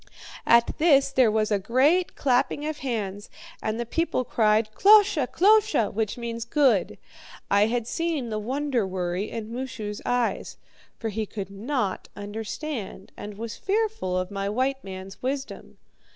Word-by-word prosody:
"At 235 Hz, 0 st, +5 dB
this 280 Hz, -4 st, +4 dB
there 255 Hz, -4 st, +4 dB
was 215 Hz, 0 st, 0 dB
a 205 Hz, -, +2 dB
great 280 Hz, -, +2 dB
clapping 270 Hz, +2 st, +1 dB
of 310 Hz, 0 st, -3 dB
hands, 205 Hz, -7 st, -4 dB, 0.3 s
and 220 Hz, +1 st, -2 dB
the 240 Hz, -, -2 dB
people 330 Hz, +2 st, 0 dB
cried, 215 Hz, -2 st, +2 dB
'KLOSHE! 400 Hz, -, +5 dB
KLOSHE!' 415 Hz, -, +4 dB
which 220 Hz, +1 st, -2 dB
means 235 Hz, -1 st, -4 dB
'good.' 235 Hz, -, +2 dB, 0.5 s
I 200 Hz, +1 st, +5 dB
had 235 Hz, 0 st, -1 dB
seen 315 Hz, -3 st, -2 dB
the 215 Hz, -, -1 dB
wonder 255 Hz, -1 st, -1 dB
worry 185 Hz, +2 st, -2 dB
in 225 Hz, 0 st, -6 dB
Moosu's 230 Hz, -5 st, -5 dB
eyes; 245 Hz, -1 st, -1 dB, 0.4 s
for 225 Hz, -, -3 dB
he 215 Hz, 0 st, -3 dB
could 200 Hz, -2 st, -6 dB
not 210 Hz, -1 st, -2 dB
understand, 210 Hz, +1 st, -6 dB
and 205 Hz, -1 st, -8 dB
was 230 Hz, +1 st, -6 dB
fearful 405 Hz, -, -1 dB
of 185 Hz, +1 st, -2 dB
my 195 Hz, 0 st, -2 dB
white 265 Hz, +5 st, -1 dB
man's 190 Hz, 0 st, -9 dB
wisdom. 270 Hz, +1 st, -5 dB
230 Hz, 150 wpm, -25 LUFS, 205-275 Hz, 0.5 s, At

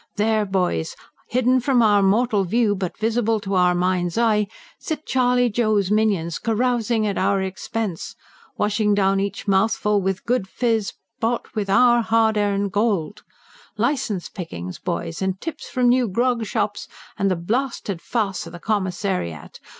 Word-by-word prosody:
There, 215 Hz, 0 st, +1 dB
boys, 180 Hz, -, -1 dB, 0.3 s
hidden 255 Hz, +1 st, +3 dB
from 250 Hz, -1 st, +2 dB
our 205 Hz, -2 st, +4 dB
mortal 210 Hz, +1 st, +2 dB
view, 215 Hz, +3 st, +2 dB
but 185 Hz, -3 st, -4 dB
visible 225 Hz, 0 st, +1 dB
to 195 Hz, 0 st, -4 dB
our 180 Hz, -1 st, +3 dB
mind's 180 Hz, 0 st, 0 dB
eye, 215 Hz, -3 st, +2 dB, 0.3 s
sit 310 Hz, -2 st, -5 dB
Charley 250 Hz, -1 st, +2 dB
Joe's 215 Hz, -4 st, +1 dB
minions, 200 Hz, -7 st, +1 dB
carousing 230 Hz, -1 st, 0 dB
at 200 Hz, -2 st, -1 dB
our 195 Hz, +1 st, +2 dB
expense, 190 Hz, 0 st, -4 dB, 0.4 s
washing 210 Hz, 0 st, +1 dB
down 195 Hz, -1 st, +2 dB
each 200 Hz, +2 st, -3 dB
mouthful 205 Hz, +1 st, +2 dB
with 190 Hz, +2 st, -2 dB
good 240 Hz, -5 st, 0 dB
fizz 225 Hz, -1 st, -1 dB, 0.3 s
bought 235 Hz, +1 st, -2 dB
with 210 Hz, -3 st, -2 dB
our 240 Hz, +3 st, +5 dB
hard 225 Hz, -1 st, +2 dB
earned 200 Hz, -1 st, 0 dB
gold. 205 Hz, -4 st, 0 dB, 0.6 s
Licence 230 Hz, -5 st, -1 dB
pickings, 90 Hz, -, -7 dB
boys, 170 Hz, -1 st, -4 dB
and 190 Hz, 0 st, -1 dB
tips 320 Hz, -2 st, -6 dB
from 250 Hz, -2 st, +1 dB
new 250 Hz, 0 st, +3 dB
grog 235 Hz, +3 st, 0 dB
shops, 205 Hz, -2 st, -2 dB, 0.3 s
and 195 Hz, -, +2 dB
the 185 Hz, -, +1 dB
blasted 205 Hz, 0 st, -2 dB
farce 200 Hz, -7 st, -2 dB
of 165 Hz, -, -11 dB
the 175 Hz, -, -8 dB
Commissariat! 180 Hz, -, -2 dB
210 Hz, 150 wpm, -22 LUFS, 190-230 Hz, 0.6 s, our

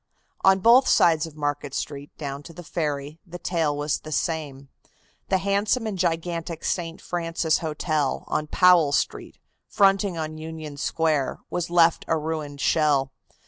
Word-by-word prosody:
On 190 Hz, 0 st, +5 dB
both 240 Hz, +5 st, +6 dB
sides 165 Hz, -1 st, +4 dB
of 155 Hz, -, -13 dB
Market 145 Hz, -2 st, -3 dB
Street, 145 Hz, -1 st, -5 dB
down 140 Hz, -2 st, -5 dB
to 165 Hz, -, -12 dB
the 175 Hz, -, -10 dB
ferry, 150 Hz, -2 st, -3 dB
the 175 Hz, -2 st, -9 dB
tale 165 Hz, -5 st, -1 dB
was 145 Hz, 0 st, -1 dB
the 155 Hz, -, -10 dB
same. 145 Hz, -4 st, -3 dB, 0.6 s
The 190 Hz, -, +3 dB
handsome 200 Hz, +5 st, 0 dB
and 215 Hz, -2 st, -3 dB
gigantic 170 Hz, -1 st, -2 dB
St. 165 Hz, -2 st, -2 dB
Francis 165 Hz, -2 st, -1 dB
Hotel, 155 Hz, -3 st, -1 dB
on 155 Hz, -, -2 dB
Powell 175 Hz, -4 st, +5 dB
Street, -, -, -2 dB, 0.3 s
fronting 195 Hz, -2 st, +2 dB
on 155 Hz, -1 st, -4 dB
Union 155 Hz, -2 st, -7 dB
Square, 155 Hz, -2 st, 0 dB
was 175 Hz, -1 st, -2 dB
left 170 Hz, -1 st, +4 dB
a 160 Hz, -, +1 dB
ruined 155 Hz, -2 st, -4 dB
shell. 145 Hz, -4 st, +2 dB
160 Hz, 150 wpm, -24 LUFS, 150-175 Hz, 0.6 s, both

